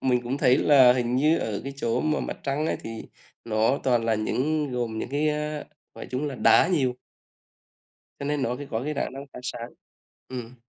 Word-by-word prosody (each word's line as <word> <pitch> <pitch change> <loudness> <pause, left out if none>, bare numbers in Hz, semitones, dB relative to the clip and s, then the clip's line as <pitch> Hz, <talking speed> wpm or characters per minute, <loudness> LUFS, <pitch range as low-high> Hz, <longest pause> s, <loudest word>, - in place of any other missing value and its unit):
mình 125 -2 +1
cũng 125 +3 -3
thấy 130 -3 +5
là 130 -4 +6
hình 125 -1 0
như 155 +5 +3
ở 105 -2 -3
cái 140 - -5
chỗ 120 -2 0
mà 155 -1 0
Mặt - - -4
Trăng 140 +3 -1
ấy - - 0
thì - - -6 0.5
nó 115 +4 +1
toàn 120 -3 +2
là 115 -1 +2
những 140 +7 -1
gồm 120 -3 -2
những - - -3
cái, 145 +2 +1
ơ, 150 0 -2 0.3
gọi - - -8
chúng 130 +4 -2
là 140 - -4
đá 165 - +5
nhiều 135 -9 +2 1.3
cho 140 - -4
nên 145 0 -1
nó 125 -1 0
cái 145 - -7
có 115 +1 -1
cái 150 - -1
khả - - -2
năng 135 +1 -7
phát - - -8
sáng. 120 -1 -5 0.6
Ừm. 125 -1 -7
130 Hz, 215 wpm, -26 LUFS, 120-150 Hz, 1.3 s, là